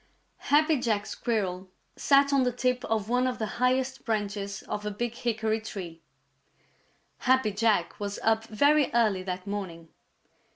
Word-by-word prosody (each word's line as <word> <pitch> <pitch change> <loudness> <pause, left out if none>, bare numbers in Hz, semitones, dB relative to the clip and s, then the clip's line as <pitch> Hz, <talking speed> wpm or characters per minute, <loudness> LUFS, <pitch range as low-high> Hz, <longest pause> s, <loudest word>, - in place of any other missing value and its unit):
_ - - -13
Happy 305 0 +4
Jack 215 -4 0
Squirrel 190 -7 -2 0.3
sat 280 0 +4
on 275 - +4
the 250 -1 +2
tip 250 +1 -1
of 220 -2 -1
one 250 +2 +2
of 250 -1 -2
the 220 - -2 0.2
highest 260 +1 +1
branches 205 -2 -3
of 210 - -5
a 210 - -2
big 230 +3 -3
hickory 220 -2 -1
tree. 175 -6 -7 1.2
Happy 260 -4 +2
Jack 205 -3 +1
was 200 -1 -4
up 225 0 +2
very 285 +7 +3
early 215 -5 +3
that 185 0 -5
morning. 185 -5 -6
220 Hz, 155 wpm, -28 LUFS, 200-250 Hz, 1.2 s, Happy